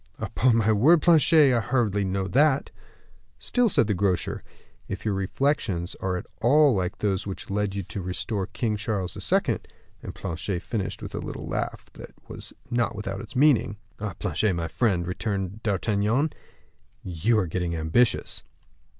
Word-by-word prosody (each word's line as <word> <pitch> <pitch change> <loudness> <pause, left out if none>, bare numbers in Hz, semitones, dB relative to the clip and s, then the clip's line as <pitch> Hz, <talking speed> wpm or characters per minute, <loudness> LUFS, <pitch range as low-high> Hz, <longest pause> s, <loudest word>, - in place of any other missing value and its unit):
"Upon 125 -2 +1
my 110 -1 +3
word, 145 +10 +5
Planchet, 155 -4 +6
I 120 - +3
hardly 110 -3 +1
know 95 0 -1
that." 140 +3 +2 0.7
"Still," 245 -2 +1
said 145 - +3
the 105 - 0
grocer, 95 -2 -1 0.4
"if 95 - -6
your 105 - +1
reflections 95 - -1
are 95 -1 -1
at - - -6 0.2
all 145 +3 +5
like 95 -2 -1
those 100 -1 -1
which 95 0 -6
led 100 -1 -1
you 100 - -2
to 100 - -6
restore 95 +2 -3
King 110 -4 -2
Charles 100 -4 -3 0.2
II. - - +2 0.2
" - - -34
and - - -8
Planchet 85 +2 -4
finished 100 -5 -3
by - - -5
a - - -5
little - - -6
laugh - - -3
which - - -10 0.2
was - - -6 0.2
not 115 -2 0
without 100 -1 -4
its - - -11
meaning. 125 -7 +3 0.2
"Ah! 105 -3 -4
Planchet, 110 -3 0
my 85 -1 -2
friend," 95 -2 0
returned 95 +2 -3
D'Artagnan, 110 - +1 0.7
"you 95 +6 +1
are 105 - +2
getting 85 0 -2
ambitious." 80 +10 +1
105 Hz, 165 wpm, -26 LUFS, 95-120 Hz, 0.7 s, Planchet